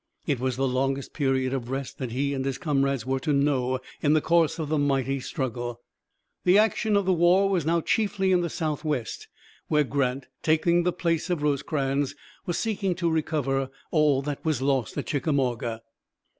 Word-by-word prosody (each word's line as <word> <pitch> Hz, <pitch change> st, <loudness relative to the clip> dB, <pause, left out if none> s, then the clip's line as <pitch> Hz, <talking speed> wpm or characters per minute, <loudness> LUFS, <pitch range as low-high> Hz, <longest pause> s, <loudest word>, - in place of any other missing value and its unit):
It 140 Hz, -6 st, 0 dB
was 130 Hz, 0 st, -1 dB
the 135 Hz, 0 st, +1 dB
longest 135 Hz, +1 st, -1 dB
period 135 Hz, -3 st, 0 dB
of 125 Hz, -3 st, -3 dB
rest 135 Hz, 0 st, -4 dB
that 130 Hz, -4 st, -4 dB
he 140 Hz, +3 st, -1 dB
and 135 Hz, -1 st, -2 dB
his 135 Hz, -1 st, -2 dB
comrades 140 Hz, -6 st, 0 dB
were 135 Hz, +1 st, 0 dB
to 150 Hz, -, -1 dB
know 135 Hz, -3 st, +2 dB, 0.2 s
in 150 Hz, 0 st, +3 dB
the 155 Hz, -, +5 dB
course 165 Hz, 0 st, +2 dB
of 160 Hz, -3 st, -3 dB
the 155 Hz, 0 st, 0 dB
mighty 135 Hz, -1 st, +1 dB
struggle. 120 Hz, -2 st, -4 dB, 0.6 s
The 180 Hz, +2 st, +5 dB
action 215 Hz, 0 st, +3 dB
of 200 Hz, -, +1 dB
the 190 Hz, -, +3 dB
war 180 Hz, +3 st, +4 dB
was 180 Hz, -6 st, 0 dB
now 170 Hz, +1 st, +2 dB
chiefly 200 Hz, 0 st, +1 dB
in 180 Hz, -1 st, +4 dB
the 170 Hz, -, -1 dB
Southwest, 150 Hz, -7 st, -3 dB, 0.4 s
where 150 Hz, -1 st, +3 dB
Grant, 135 Hz, -1 st, -1 dB, 0.2 s
taking 170 Hz, +2 st, +3 dB
the 180 Hz, +1 st, +1 dB
place 170 Hz, -1 st, -1 dB
of 170 Hz, -4 st, -1 dB
Rosecrans, 140 Hz, -1 st, 0 dB, 0.3 s
was 175 Hz, -, -1 dB
seeking 200 Hz, -4 st, -1 dB
to 170 Hz, -2 st, 0 dB
recover 135 Hz, -4 st, 0 dB, 0.2 s
all 150 Hz, -4 st, +3 dB
that 145 Hz, 0 st, -4 dB
was 155 Hz, -5 st, 0 dB
lost 135 Hz, -3 st, 0 dB
at -, -, -2 dB
Chickamauga. 125 Hz, -6 st, -1 dB
145 Hz, 185 wpm, -26 LUFS, 135-165 Hz, 0.6 s, the